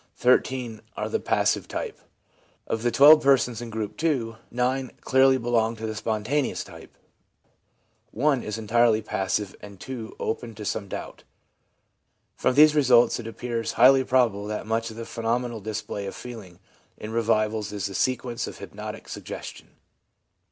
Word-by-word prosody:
13 125 -2 +1 0.2
are - - -2
of - - -5
the - - +1
passive - - +1
type. - - -5 0.7
Of 115 - -2
the 120 - +2
12 145 +6 +8
persons 125 -4 +2
in 120 - -6
Group 110 +5 -5
II., 125 -9 0
9 125 +2 -1
clearly 130 0 +4
belong 115 -2 +1
to 110 0 -6
the 110 - -3
spontaneous 110 +7 -1
type, - - -14 1.1
1 135 +2 +1
is 105 0 -4
entirely 110 0 +2
passive, 95 0 -2
and 100 -2 -11
2 120 -2 -7
are - - -3
open 115 0 -4
to 105 0 -8
some 100 0 -2
doubt. - - -7 1.1
From 125 - +1
these 150 +1 +7
results 125 -6 +4
it 115 - -6
appears 115 0 -3
highly 130 +3 +6
probable 120 -6 +1
that 105 0 -4
much 115 +1 -1
of 110 - -10
the 115 - -6
phenomenal 115 0 -2
display 105 -1 -4
of 95 - -6
feeling 110 -8 -10 0.4
in 110 - -7
revivals 110 -1 0
is 100 -2 -4
the 100 - -4
sequence 125 +2 -1
of - - -8
hypnotic - - -8
suggestion. - - -8
115 Hz, 160 wpm, -25 LUFS, 110-125 Hz, 1.1 s, 12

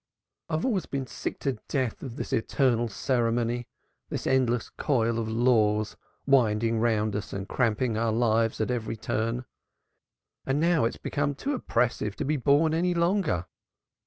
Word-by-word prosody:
"I 160 - 0
have 160 - -1
always 205 -10 0
been 135 -1 -3
sick 110 - -5
to 135 -5 -1
death 130 -6 -1
of 125 -4 -7
this - - -5
eternal 120 0 +2
ceremony, 120 +1 0 0.4
this - - -4
endless 125 -3 +1
coil 115 -5 0
of 110 -1 -2
laws 110 -3 +2 0.3
winding 115 -4 +3
round 110 -2 +1
us 105 - -4
and 100 0 -4
cramping 115 -1 0
our 115 -1 +1
lives 115 0 +2
at 110 +3 0
every 115 -2 -3
turn; 115 +3 -2 1.0
and 135 +2 0
now 165 -4 +3
it 115 - 0
has - - -11
become 145 -1 -1
too 280 - -2
oppressive 120 - 0
to - - -3
be 150 +3 +1
borne 145 +4 +3
any 175 +2 +1
longer. 170 - +1
120 Hz, 160 wpm, -27 LUFS, 110-140 Hz, 1.0 s, winding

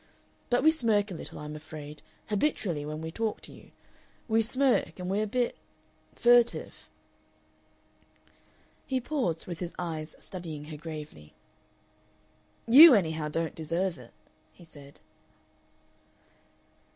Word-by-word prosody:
But 245 0 +2
we 315 - +7
smirk 220 -9 +1
a - - -4
little, 165 - -8
I'm 150 0 -7
afraid, 150 -1 -10 0.3
habitually 205 - -1
when 155 +1 -5
we 160 0 -5
talk 220 +4 -2
to - - -9
you. - - -16 0.6
We 225 -1 +3
smirk, 255 - +1
and 180 0 -4
we're 210 +2 +1
a - - -6
bit 245 +3 -1 0.6
furtive." 240 0 +2 2.0
He 260 -1 0
paused, 240 - -2
with 175 -2 -6
his 175 -1 -5
eyes 160 -3 -5
studying 160 -5 -8
her 155 0 -8
gravely. 150 - -9 1.3
"You, 280 +4 +10
anyhow, 160 -5 0
don't 165 +2 -2
deserve 170 +1 -2
it," 120 -2 -14 0.4
he 175 - -18
said. 145 -3 -15
175 Hz, 125 wpm, -28 LUFS, 155-225 Hz, 2.0 s, You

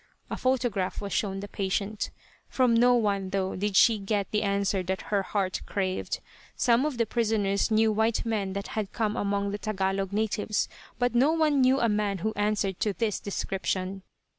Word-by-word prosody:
(A - - -1
photograph 245 -8 0
was 200 -1 -5
shown 195 -2 -1
the 205 - -6
patient) 200 +1 -2 0.4
From 255 -3 +3
no 245 +2 +5
one, 200 -4 0
though, 190 0 -1
did 200 +1 -2
she 220 +1 +6
get 200 0 -1
the 210 - +1
answer 200 -1 +1
that 190 +1 -3
her 200 - +3
heart 195 -1 -2
craved. 190 -2 -2 0.3
Some 245 +4 +3
of 285 -5 -4
the 230 - +2
prisoners 215 -3 +1
knew 220 0 +3
white 220 +2 +1
men 205 -4 -1
that 200 +1 -4
had 210 -2 -3
come 215 -2 0
among 200 -2 -1
the 205 - -4
Tagalog 195 -2 -1
natives, 215 0 0 0.3
but 245 -1 +1
no 265 +6 +4
one 305 -4 +3
knew 260 +1 +4
a 235 - +3
man 210 -2 0
who 220 - 0
answered 205 -2 0
to 210 - 0
this 210 +2 -1
description. 195 -1 -3
205 Hz, 185 wpm, -27 LUFS, 195-225 Hz, 0.4 s, she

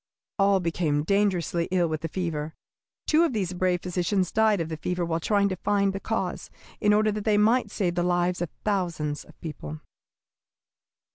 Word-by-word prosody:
All 195 0 +4
became 165 -4 0
dangerously 180 -2 +1
ill 180 -2 +2
with 155 -1 -3
the 165 - -2
fever. 160 -3 -3 0.5
Two 315 +1 +4
of 330 - +1
these 190 -5 -1
brave 180 -1 0
physicians 180 +1 0
died 220 -2 +3
of 165 - -1
the 160 -1 -5
fever 180 +2 -2
while 165 0 -1
trying 200 +3 +2
to 185 - -2
find 200 +1 +1
the 195 - -3
cause, - - -3 0.3
in 210 - +3
order 215 +1 +3
that 210 0 -4
they 210 -1 +3
might 220 +2 +3
save 185 -4 -1
the 175 - 0
lives 175 0 +1
of 175 - -1 0.2
thousands 170 -8 -1
of - - -19
people." 80 - -7
180 Hz, 185 wpm, -26 LUFS, 170-205 Hz, 0.5 s, All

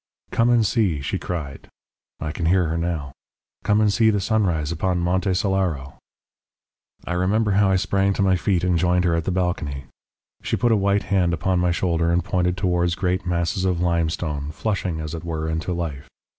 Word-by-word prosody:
"'Come 115 +1 +2
and 120 -2 +4
see,' 100 -7 +1
she 70 - -3
cried 75 -6 -5 0.5
I 80 - -3
can 85 +1 -2
hear 90 +1 +3
her 80 - -1
now 80 -5 -3 0.5
'come 105 +1 +2
and 105 -2 +3
see 110 0 +4
the 105 -2 +1
sunrise 95 -7 0
upon 90 +2 0
Monte 90 +2 0
Solaro.' 90 -8 -1 1.1
"I 90 - -3
remember 100 +5 +1
how 100 0 +3
I 95 - +3
sprang 95 +1 +1
to 100 - 0
my 95 -1 +3
feet 90 -1 0
and 90 -2 +2
joined 90 +1 +2
her 85 - +2
at 85 -1 -1
the - - 0
balcony. 90 -7 -2 0.6
She - - -1
put 120 -1 +2
a - - +5
white 100 0 +1
hand 90 -4 +1
upon 95 +2 0
my 90 0 +2
shoulder 85 -1 0
and 85 0 +1
pointed 90 0 0
towards 90 -2 +1
great 90 -1 -1
masses 85 +1 -1
of 90 -2 +1
limestone, 80 -4 -1
flushing, 90 0 -2
as 80 0 -5
it 85 - -6
were, 80 -2 -3
into 80 +3 -2
life. 80 -5 -4
90 Hz, 195 wpm, -23 LUFS, 85-95 Hz, 1.1 s, a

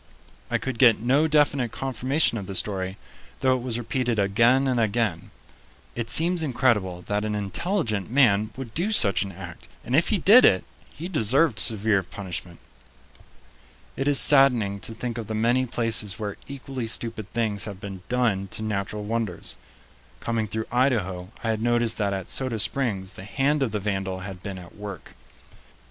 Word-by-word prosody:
I - - +1
could 130 -3 -5
get 120 -4 +6
no 135 +7 +2
definite 145 -5 +2
confirmation 130 +1 0
of 95 - -8
the 100 - -6
story, 95 -1 -1 0.4
though 130 -1 +3
it 125 - -4
was 120 -2 -2
repeated 120 0 -2
again 115 +7 +3
and 125 -2 +1
again. 105 -5 -1 0.6
It 120 -1 -4
seems 170 +5 +4
incredible 115 - 0
that 105 +1 -2
an 105 -1 -2
intelligent 110 - -2
man 110 -5 +3
would 125 -5 -7
do 185 +7 0
such 100 - +5
an 100 - -3
act, 90 -1 -10 0.2
and 125 - 0
if 160 - +3
he 215 - +2
did 210 +8 +7
it, 95 - +5 0.3
he 165 +4 -8
deserved 140 - +2
severe 105 -2 +3
punishment. 90 -2 -7 1.4
It 135 - -2
is 145 -2 +4
saddening 125 -8 +5
to 115 - -6
think 120 0 -4
of 110 - -6
the 110 - -3
many 120 +4 +1
places 115 -4 -1
where 105 -3 -4
equally 135 -3 -6
stupid 110 -2 -2
things 105 -3 -1
have 100 -3 -7
been 100 -3 -8
done 115 -6 0
to 110 - -4
natural 105 0 -3
wonders. 110 -4 -3 0.6
Coming 115 -2 -2
through 110 +1 -4
Idaho, 105 -8 0
I 115 - +1
had 110 -1 -3
noticed 120 -1 +1
that 100 -1 0
at 95 -2 -4
Soda 130 -4 -1
Springs 105 -5 -2
the 95 - -10
hand 140 +8 0
of 130 -5 0
the 105 - -2
vandal 95 -2 -3
had 95 -1 -8
been 100 -1 -6
at 90 -2 -12
work. 100 -5 -9
115 Hz, 175 wpm, -25 LUFS, 100-130 Hz, 1.4 s, did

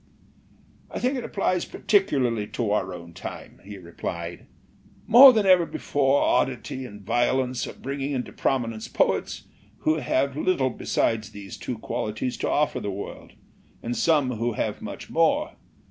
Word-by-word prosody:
'* - - -30
"I - - -5
think 255 +3 0
it 250 - -3
applies 185 -4 0
particularly 130 - +1
to 110 -4 0
our 95 -3 0
own 85 -1 -9
time/' - - -9
he 100 +1 -9
replied. 85 -1 -6 0.6
"More 255 +4 +10
than 215 -4 +1
ever 185 -2 +6
before 140 0 +1
oddity 130 +1 0
and 105 -3 -12
violence 125 +3 0
are - - -7
bringing 140 +1 -4
into 125 -2 -4
prominence 115 -5 -1
poets - - 0 0.4
who 155 0 +2
have 140 -2 0
little 150 -5 +1
besides 110 -1 -1
these 100 -1 -9
two 125 - -5
qualities 115 +1 -3
to - - -2
offer 150 +1 +1
the 105 - -4
world, 100 +1 -7 0.5
and 120 +1 -3
some 145 -5 +2
who 120 +1 -1
have - - -3
much - - -8
more. - - +2
125 Hz, 155 wpm, -25 LUFS, 105-145 Hz, 0.6 s, More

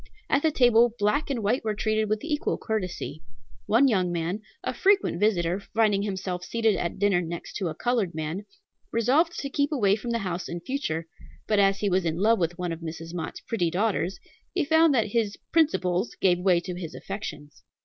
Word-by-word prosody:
At 280 - +4
the 320 - +3
table 240 -4 +4
black 210 +9 +1
and 245 -6 -2
white 235 +6 +1
were 215 -1 -1
treated 215 0 0
with 215 +3 -1
equal 300 -2 -1
courtesy. 185 -8 -4 0.5
One 240 +6 +5
young 185 -7 +1
man, 175 +4 -2 0.2
a - - -2
frequent 390 - +2
visitor, 185 -3 +2 0.2
finding 215 -3 +3
himself 190 -3 -3
seated 225 +1 +1
at 170 -1 -3
dinner 195 -3 +3
next 170 0 -6
to 190 - -2
a 155 - -4
colored 230 -8 0
man, 160 +6 -4 0.4
resolved 280 +10 +2
to 280 - -3
keep 285 +2 +1
away 205 -9 +3
from 230 +3 -6
the 235 - +1
house 180 0 -3
in 170 - -4
future; 170 - -3 0.4
but 210 -2 +2
as 195 0 +3
he 210 - +1
was 185 +1 +2
in 165 -1 -1
love 220 +4 +3
with 170 0 -1
one 180 -1 -2
of 165 - -5
Mrs. 165 0 -7
Mott's 165 -2 -5
pretty 190 -8 -1
daughters, 190 0 0 0.4
he 345 -5 +1
found 320 +1 +5
that 220 -3 +2
his 220 -3 0
"principles" 200 - +1
gave 180 -2 +3
way 180 -1 +3
to 180 +1 -5
his 175 -2 -7
affections. 150 -7 -7
200 Hz, 200 wpm, -26 LUFS, 175-230 Hz, 0.5 s, One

